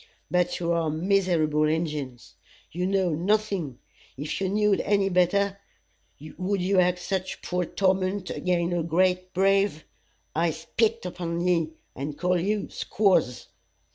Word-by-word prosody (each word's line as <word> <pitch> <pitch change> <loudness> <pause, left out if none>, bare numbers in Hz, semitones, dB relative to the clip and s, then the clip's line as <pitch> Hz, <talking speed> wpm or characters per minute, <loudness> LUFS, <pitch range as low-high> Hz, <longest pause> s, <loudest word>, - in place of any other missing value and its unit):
But 180 0 +1
you 170 -1 -1
are 165 -2 +1
miserable 160 -3 +2
Injins! 150 -6 -3 0.4
You 180 +2 -2
know 190 -2 +1
nothing. 180 - 0 0.4
If 150 +7 -4
you 190 - 0
know'd 210 0 +2
any 200 -1 +2
better, 195 +2 +2 0.8
would 195 +2 0
you 185 +1 +2
act 180 0 +3
such 185 +1 -4
poor 180 -1 -1
torment 190 +1 0
ag'in' 175 -1 0
a 175 - 0
great 180 +2 +1
brave? 195 -3 +2 0.5
I 165 +2 +2
spit 225 +7 -1
upon 170 -1 -3
ye, 165 -3 +1 0.2
and 145 +2 -5
call 180 0 +1
you 205 +3 -1
squaws. 185 - +1
180 Hz, 135 wpm, -26 LUFS, 165-195 Hz, 0.8 s, act